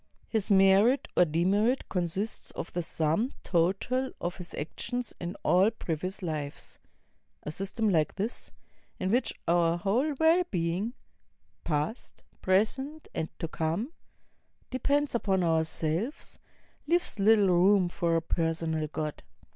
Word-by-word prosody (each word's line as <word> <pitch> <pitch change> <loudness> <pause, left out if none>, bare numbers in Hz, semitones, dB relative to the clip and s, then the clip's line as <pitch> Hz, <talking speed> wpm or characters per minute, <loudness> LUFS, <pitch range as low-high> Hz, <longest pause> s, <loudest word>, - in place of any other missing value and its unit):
His 220 -3 0
merit 200 +6 +5
or 180 - +6
demerit 195 - +1
con 180 -2 -1
sists 195 +6 -3
of - - -6
the 175 - -1
sum 165 +8 0
total 195 +10 +1
of 175 +1 -3
his 180 -1 -5
actions 245 - -4
in 175 +1 -4
all 190 +4 +5
pre\aous 185 -2 -4
lives. 150 -4 -5 0.6
A 150 - -4
system 195 +6 -2
like 160 -6 +2
this, 210 +5 -2 0.5
in 185 - -1
which 245 +3 +2 0.2
our 170 0 +3
whole 240 - 0
well 325 +3 +5
being 180 +7 -1 0.3
— - - -44
past, 155 - -3 0.2
present, 265 +11 0
and 160 - -2
to 165 - -3
come 165 - -2 0.4
— - - -41
depends 285 +3 +1
upon 195 -6 +1
ourselves, 165 - -1 0.5
leaves 345 - 0
little 205 -1 +5
room 185 +1 +4
for 170 -1 0
a 165 - +1
personal 165 -2 -1
God. 150 0 -4
185 Hz, 135 wpm, -29 LUFS, 165-225 Hz, 0.6 s, or